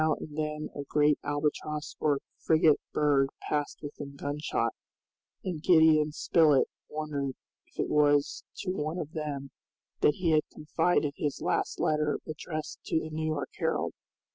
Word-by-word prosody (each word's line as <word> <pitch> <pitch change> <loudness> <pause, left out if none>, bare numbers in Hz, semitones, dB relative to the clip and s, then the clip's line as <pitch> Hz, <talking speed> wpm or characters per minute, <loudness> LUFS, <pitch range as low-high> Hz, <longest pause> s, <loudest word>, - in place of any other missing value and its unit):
Now 155 -1 +3
and 150 - -9
then 150 0 -2
a 145 - -5
great 150 +1 +3
albatross 150 +1 -2
or 145 -2 +2 0.2
frigate 155 -2 +4
bird 140 -2 +3 0.2
passed 150 0 -2
within 145 -1 -7
gunshot, 145 +2 -1 0.7
and 180 -5 -3
Gideon 160 -3 +5
Spilett 150 -2 +4 0.2
wondered 145 -3 -3 0.3
if - - -21
it - - +1
was 145 -1 +3 0.2
to 185 - -2
one 155 -2 -2
of 155 -4 -4
them 145 -3 -4 0.5
that 150 - +4
he 175 -3 +1
had 155 -1 +5
confided 155 -1 +1
his 145 -2 -2
last - - -1
letter 150 -1 +1
addressed 155 0 -5
to 160 - +1
the 160 0 -6
New 155 0 -2
York 155 -3 -2
Herald. - - 0
150 Hz, 150 wpm, -29 LUFS, 145-155 Hz, 0.7 s, Gideon